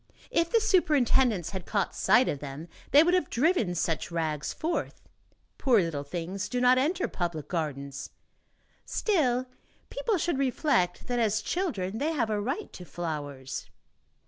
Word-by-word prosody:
If 335 Hz, 0 st, +2 dB
the 460 Hz, -, +4 dB
superintendents 265 Hz, -, +3 dB
had 190 Hz, -3 st, -6 dB
caught 200 Hz, -4 st, 0 dB
sight 250 Hz, +1 st, +4 dB
of 145 Hz, -, -1 dB
them, 145 Hz, +3 st, -7 dB, 0.2 s
they 290 Hz, +2 st, +7 dB
would 350 Hz, +2 st, +2 dB
have 360 Hz, -6 st, +2 dB
driven 240 Hz, -, +2 dB
such 165 Hz, -1 st, -1 dB
rags 160 Hz, -3 st, -2 dB
forth. 325 Hz, +2 st, -3 dB, 0.5 s
Poor 245 Hz, -5 st, +4 dB
little 165 Hz, -5 st, -1 dB
things 175 Hz, +6 st, -4 dB
do 250 Hz, -, -1 dB
not 250 Hz, +1 st, +5 dB
enter 335 Hz, +7 st, +1 dB
public 170 Hz, -4 st, -3 dB
gardens; 140 Hz, -5 st, -4 dB, 0.7 s
still, 255 Hz, -, +1 dB, 0.5 s
people -, -, 0 dB
should 335 Hz, -4 st, -1 dB
reflect 255 Hz, -, +1 dB
that, 245 Hz, -1 st, -1 dB
as 215 Hz, -2 st, +2 dB
children, 225 Hz, -, -2 dB
they 315 Hz, +3 st, 0 dB
have 230 Hz, -7 st, 0 dB
a 210 Hz, -1 st, 0 dB
right 275 Hz, -, -3 dB
to 180 Hz, -, -9 dB
flowers. 145 Hz, -6 st, -5 dB
225 Hz, 150 wpm, -28 LUFS, -, 0.7 s, they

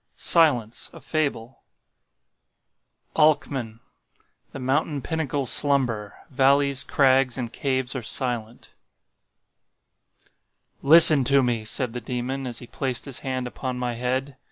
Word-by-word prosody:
SILENCE—A 125 Hz, -10 st, 0 dB
FABLE 135 Hz, -6 st, -4 dB, 1.6 s
"The 140 Hz, -7 st, 0 dB, 0.8 s
mountain 135 Hz, +2 st, -1 dB
pinnacles 145 Hz, -4 st, -2 dB
slumber; 125 Hz, -8 st, 0 dB, 0.2 s
valleys, 140 Hz, +1 st, +2 dB
crags 130 Hz, -2 st, +2 dB
and 120 Hz, -3 st, -5 dB
caves 130 Hz, -2 st, -2 dB
are 130 Hz, -, -3 dB
silent." 120 Hz, 0 st, -4 dB, 2.1 s
"Listen 155 Hz, -1 st, +8 dB
to 140 Hz, +1 st, +4 dB
me," 120 Hz, -3 st, -1 dB
said 115 Hz, +2 st, -3 dB
the 125 Hz, -, -6 dB
Demon 130 Hz, +2 st, -5 dB
as 120 Hz, -3 st, -6 dB
he 120 Hz, -, -9 dB
placed 130 Hz, 0 st, -4 dB
his 135 Hz, -3 st, -6 dB
hand 130 Hz, -1 st, -4 dB
upon 125 Hz, +1 st, -6 dB
my 125 Hz, -1 st, -3 dB
head. 130 Hz, +3 st, -3 dB
130 Hz, 105 wpm, -23 LUFS, 120-140 Hz, 2.1 s, Listen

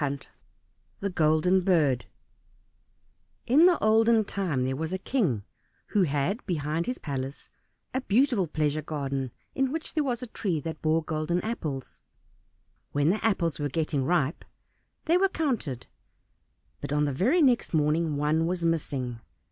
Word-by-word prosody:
57 140 Hz, -1 st, -3 dB, 0.7 s
The 200 Hz, -, -1 dB
Golden 160 Hz, +3 st, +3 dB
Bird 155 Hz, -9 st, +2 dB, 1.4 s
In 300 Hz, +8 st, +6 dB
the 360 Hz, -, +4 dB
olden 220 Hz, +1 st, +4 dB
time 170 Hz, -11 st, -1 dB
there 130 Hz, +1 st, -1 dB
was 160 Hz, +4 st, -3 dB
a 190 Hz, -, -1 dB
king, 185 Hz, -, 0 dB, 0.5 s
who 205 Hz, -, +2 dB
had 155 Hz, -, 0 dB
behind 160 Hz, -1 st, -1 dB
his 250 Hz, -, -2 dB
palace 135 Hz, -1 st, -5 dB, 0.4 s
a 260 Hz, -, 0 dB
beautiful 235 Hz, -4 st, +2 dB
pleasure 155 Hz, 0 st, 0 dB
garden 140 Hz, -3 st, -3 dB, 0.2 s
in 270 Hz, -1 st, 0 dB
which 320 Hz, +1 st, -4 dB
there 310 Hz, -, +1 dB
was 250 Hz, -3 st, -2 dB
a 235 Hz, -, -9 dB
tree 175 Hz, -7 st, -1 dB
that 160 Hz, +1 st, -6 dB
bore 160 Hz, +1 st, +2 dB
golden 155 Hz, +2 st, -1 dB
apples. 155 Hz, -, -5 dB, 0.9 s
When 145 Hz, +3 st, +3 dB
the 210 Hz, -, -2 dB
apples 180 Hz, -8 st, +1 dB
were 145 Hz, 0 st, -1 dB
getting 155 Hz, -2 st, -1 dB
ripe 160 Hz, -1 st, 0 dB, 0.6 s
they 335 Hz, +2 st, +4 dB
were 390 Hz, +1 st, +3 dB
counted, 240 Hz, -, -2 dB, 0.9 s
but -, -, -6 dB
on 150 Hz, 0 st, +2 dB
the 145 Hz, -, -1 dB
very 260 Hz, -, +3 dB
next 250 Hz, -4 st, +3 dB
morning 155 Hz, 0 st, +1 dB
one 155 Hz, +3 st, +1 dB
was 175 Hz, -1 st, -1 dB
missing. 135 Hz, -7 st, -1 dB
165 Hz, 150 wpm, -27 LUFS, 145-215 Hz, 1.4 s, In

